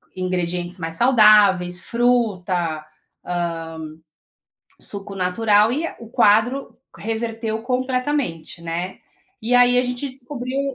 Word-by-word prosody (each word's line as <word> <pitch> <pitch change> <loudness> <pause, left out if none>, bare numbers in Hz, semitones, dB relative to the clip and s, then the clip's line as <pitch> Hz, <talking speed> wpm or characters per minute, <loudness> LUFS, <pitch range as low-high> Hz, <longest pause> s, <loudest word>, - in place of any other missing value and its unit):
ingredientes 180 -1 -2
mais 165 -1 -3
saudáveis, 210 -7 +5
fruta, 185 -10 0 0.4
hã, 175 -1 -2 1.2
suco 200 -1 -5
natural. 210 +4 +2
E 315 +5 -1
a - - -12
o 230 - -11
quadro 225 +6 +2 0.2
reverteu 225 0 -3
completamente, 255 - -2
né. 170 +3 -4 0.4
E 245 +3 0
aí 245 0 +5
a - - +3
gente 250 +2 -3
descobriu 260 0 -5
215 Hz, 105 wpm, -21 LUFS, 180-245 Hz, 1.2 s, saudáveis